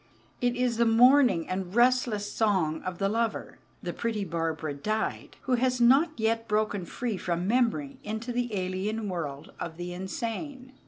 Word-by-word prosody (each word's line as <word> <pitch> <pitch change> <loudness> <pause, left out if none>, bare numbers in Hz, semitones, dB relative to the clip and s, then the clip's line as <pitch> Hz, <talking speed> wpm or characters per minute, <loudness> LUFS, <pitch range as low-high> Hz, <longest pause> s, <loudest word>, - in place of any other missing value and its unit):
It 245 0 +1
is 245 -2 0
the 235 - +4
mourning 245 - +5
and 185 +1 -4
restless 240 -4 +2
song 185 -8 +1
of 185 -1 -5
the 195 - +1
lover 225 +2 -2 0.2
("the - - -3
pretty 225 -3 -2
Barbara 165 -3 -2
died") 215 +10 -3
who 260 - 0
has 250 0 +2
not 265 +8 +5
yet 225 0 0
broken 210 -3 0
free 230 +3 -3
from 175 0 -2
memory 255 +4 +1
into 220 +3 -4
the 245 0 -1
alien 190 +4 -2
world 155 -5 -5
of 160 -1 -5
the 175 0 -5
insane. 240 - -5
220 Hz, 160 wpm, -28 LUFS, 185-245 Hz, 0.2 s, mourning